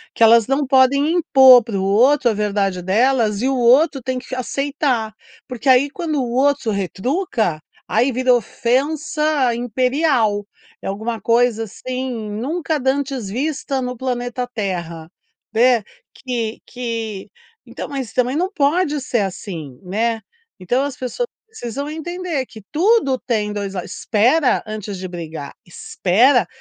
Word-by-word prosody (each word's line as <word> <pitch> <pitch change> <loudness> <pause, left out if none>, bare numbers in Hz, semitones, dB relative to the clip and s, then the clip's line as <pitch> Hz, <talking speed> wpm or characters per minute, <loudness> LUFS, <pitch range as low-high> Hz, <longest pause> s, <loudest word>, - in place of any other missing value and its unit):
Que - - +3
elas 225 0 +6
não 275 +2 +1
podem 270 +3 +3
impor 265 -7 +7
pro 210 -4 -3
outro 240 +6 +4
a - - -1
verdade 200 -3 -1
delas 215 +2 +2
e 255 - +1
o 270 - +1
outro 265 +4 +4
tem 255 +1 -3
que 255 +1 -8
aceitar. 255 -2 -1 0.3
Porque 255 0 -3
aí 260 +2 +5
quando 320 0 -4
o 240 - -4
outro 270 -2 +1
retruca, 200 - -1 0.3
aí 245 +5 +2
virou 250 0 +3
ofensa 285 +3 0
imperial, 245 -2 +1 0.4
é - - -6
alguma 220 +3 -3
coisa 230 +1 +2
assim, 255 +5 -5 0.2
nunca 305 +8 -2
dantes 265 -4 -1
vista 275 +3 -2
no 250 0 -4
planeta 245 0 -3
terra, 170 -7 -4 0.4
né. 235 0 +4 0.3
Que 235 -4 -4
que 230 -5 -5 0.4
então - - -7
mas 270 -5 -5
também 250 +1 +1
não 365 +5 0
pode 300 -1 +1
ser 245 -2 -1
assim, 175 - -5
né. 220 +5 -1 0.4
Então 245 +9 0
as 280 -2 -4
pessoas 260 - -3 0.2
precisam 280 - -6
entender 320 -2 -4
que 220 -2 -13
tudo 335 - +2
tem 210 -4 -1
2 200 -1 -4
lados 180 -1 -5
espera 250 +7 +2
antes 215 -2 -6
de 185 0 -5
brigar, 160 -5 -7
espera. 205 +6 +2
245 Hz, 140 wpm, -19 LUFS, 215-275 Hz, 0.4 s, impor